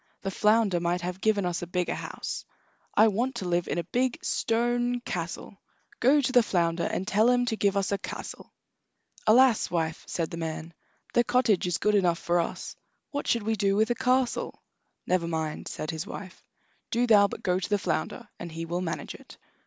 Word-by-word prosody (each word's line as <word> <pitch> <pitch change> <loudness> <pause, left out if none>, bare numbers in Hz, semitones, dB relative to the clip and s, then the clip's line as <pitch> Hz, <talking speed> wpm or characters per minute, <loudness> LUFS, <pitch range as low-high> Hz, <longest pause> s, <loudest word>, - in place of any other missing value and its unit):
The 195 - -2
flounder 210 -2 +3
might 170 +1 0
have 180 +1 -5
given 210 -3 +2
us 175 -1 -2
a 175 - -5
bigger 180 0 -1
house. - - -5 0.5
I 220 - +7
want 235 +5 0
to 190 -6 -4
live 175 -1 0
in - - -2
a 170 - 0
big 250 +8 0
stone 240 +1 +1
castle. 180 0 -5 0.4
Go 280 +5 +5
to 255 - 0
the 250 -1 +6
flounder, 170 -5 0
and 190 - -2
tell 215 +4 +4
him 245 0 +3
to 230 - -1
give 200 -2 +1
us 195 0 0
a 200 - 0
castle." - - -7 0.8
"Alas, 240 +1 +5
wife!" 160 -2 -2
said 165 -2 -2
the 170 - -5
man; 165 0 -5 0.4
"the 240 - +4
cottage 235 -7 +2
is 175 - 0
good 210 - +1
enough 180 -4 +3
for 175 +1 +1
us; 170 - -3 0.4
what 285 -1 -3
should 235 -3 +1
we 220 +1 0
do 195 -1 +1
with 220 +3 +2
a - - +4
castle?" 255 +1 0 0.4
"Never 180 -2 +1
mind," 160 -2 -3
said 155 - -4
his 160 +4 -5
wife; 185 -3 -9 0.5
"do 240 +1 +2
thou 205 -4 +6
but - - -8
go 180 0 +1
to 190 - -4
the 205 - +3
flounder, 185 +6 -3
and 170 - -6
he 165 +1 -5
will 175 +2 -2
manage 165 -3 -4
it." - - -14
195 Hz, 200 wpm, -27 LUFS, 175-230 Hz, 0.8 s, I